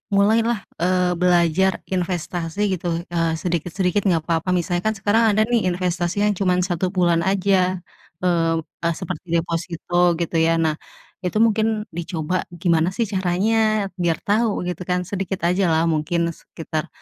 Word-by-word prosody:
mulai 205 +3 +4
lah, 235 -4 -1 0.2
eee, 180 +1 +2
belajar 180 +1 +2
investasi 175 -1 -3
gitu, 170 -1 -2
eee, 165 -1 +1
sedikit-sedikit 180 +3 -1
nggak 165 -4 +2
apa-apa. 165 +1 -1
Misalnya 175 0 0
kan 220 - 0
sekarang 210 +3 +2
ada 215 - +3
nih 230 -3 +1
investasi 180 +2 -1
yang 210 - +3
cuma 185 -2 +2
1 180 0 -1
bulan 175 -3 +2
aja, 185 -2 +1 0.4
eee, 165 -2 +2 0.3
e - - +4
seperti 165 0 -6
deposito, 170 +1 0
gitu, 170 0 -3
ya. 165 +1 +3
Nah, 160 -2 +1 0.5
itu 180 +4 -1
mungkin 220 -1 +1
dicoba 170 0 -3 0.3
gimana 170 -1 +2
sih 235 - +1
caranya, 200 +3 +1
biar 170 -2 +1
tahu 215 0 +1
gitu 180 0 -5
kan, 180 0 +1
sedikit 195 -1 -3
aja 185 +1 +2
lah 160 -1 +2
mungkin 170 +2 0
sekitar, 160 -1 -6
180 Hz, 150 wpm, -22 LUFS, 170-195 Hz, 0.5 s, mulai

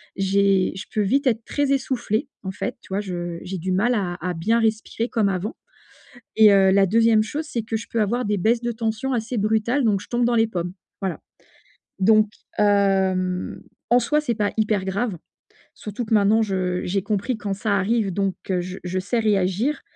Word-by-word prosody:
J'ai 195 -1 +2
je 190 - -6
peux 215 - +1
vite 270 +8 +1
être 230 -2 +1
très 285 -1 0
essoufflée 260 -2 -1
en 190 - -3
fait, 190 - -4
tu - - -19
vois? 200 - 0
Je 175 -3 -5
j'ai 185 +1 -5
du 185 +2 -2
mal 225 +7 +2
à 185 -5 -1
à 180 +1 -2
bien 220 +8 +1
respirer 225 +1 -1
comme 220 -4 +1
avant, 195 +4 -3 0.8
et 220 -1 +7
heu, 190 -1 +5
la 195 0 +4
2e 225 +2 +4
chose 290 +9 -4
c'est 240 -7 -3
que 220 0 -3
je 225 - -6
peux 230 - 0
avoir 235 +4 0
des 205 0 0
baisses 230 +5 +2
de 240 - -1
tension 225 +3 -2
assez 235 +1 -2
brutales, 220 +5 +1
donc 205 -3 +2
je 205 - -12
tombe 240 0 +1
dans 240 0 +2
les 225 -1 +4
pommes, 180 -5 -4 0.3
voilà, 190 -2 -2 0.8
donc 215 +2 +4 0.3
hem, 190 -3 +1 0.3
en 245 - +6
soi, 300 +6 +1
c'est 245 -6 -1
pas 205 -1 0
hyper 210 -3 +1
grave, 200 +1 -2 0.6
surtout 210 +3 -5
que 220 - -6
maintenant 215 +2 +4
je 185 -3 -1
j'ai 195 +2 -1
compris 215 +4 -1
quand 205 -2 -3
ça 200 0 0
arrive, 205 0 0
donc 195 0 0 0.2
heu, 180 -1 +1
je 185 +1 -6
je 185 +1 -2
sais 225 +5 -1
réagir, 210 +6 +1
210 Hz, 200 wpm, -23 LUFS, 190-230 Hz, 0.8 s, et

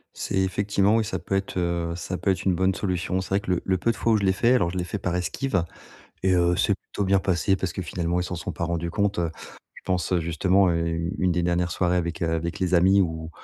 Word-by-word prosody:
C'est - - -3
effectivement 100 +2 +1
oui, 115 - +2
ça 110 - -3
peut 95 - -3
être, 95 -1 -2
heu, 85 -1 -1
ça 90 +1 -4
peut 95 - +1
être 95 0 -2
une 95 -2 +2
bonne 95 +1 +2
solution. 95 -1 -1
C'est - - -8
vrai 100 - +2
que 95 - -3
le 90 - +1
le 95 -1 +1
peu 115 +6 +1
de - - -6
fois 115 - +1
où - - +4
je 100 - -2
l'ai 95 -1 +3
fait, 120 +6 +3
alors 85 -9 +2
je 95 - -5
l'ai 90 - 0
fait 105 - -4
par 90 -2 -2
esquive 95 +2 -1 0.6
et 95 -1 +3
heu, 85 0 +3
c'est 100 +2 +2
plutôt 100 - -5
bien 100 0 +3
passé 95 +1 +1
parce 95 -2 -3
que, - - -4
finalement, 85 0 -2
ils 90 - 0
s'en 90 0 -4
sont 85 - -5
pas - - -5
rendus 85 0 -2
compte, 100 +1 0
heu, 85 -2 0 0.4
je - - -14
pense, 90 -1 -1
heu, 90 - +2
justement, 90 +4 +2
heu, 85 0 0
u 85 +1 -2
une 90 -1 +2
des 85 - 0
dernières 85 0 0
soirées 90 0 +1
avec, 85 0 -3
heu, 80 - +1
avec 85 +1 -2
les 90 0 0
amis 95 +3 +5
où 80 -2 -4
90 Hz, 280 wpm, -25 LUFS, 85-95 Hz, 0.6 s, amis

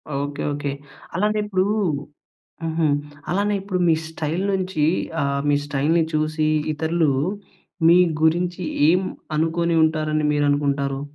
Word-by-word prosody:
Okay 145 +1 -3
okay. 145 -1 -3 0.4
అలానే 210 +3 +1
ఇప్పుడు 190 -2 +1 1.0
హుహు. 160 -1 0 0.4
అలానే 205 +3 +1
ఇప్పుడు 190 -2 -2
మీ 160 - +5
స్టైల్ 160 +3 -3
నుంచి 185 -5 -1 0.4
ఆహ్, 140 0 0
మీ 145 - +4
స్టైల్‌ని 150 +4 +1
చూసి 155 0 0 0.3
ఇతరులు 160 -1 +1 0.8
మీ 170 +1 +7 0.3
గురించి 175 +2 +1 0.3
ఏం 180 +2 +4 0.4
అనుకుని 165 +1 +1
ఉంటారని 155 -1 0
మీరనుకుంటారు? 140 -1 0
160 Hz, 115 wpm, -22 LUFS, 145-175 Hz, 1.0 s, మీ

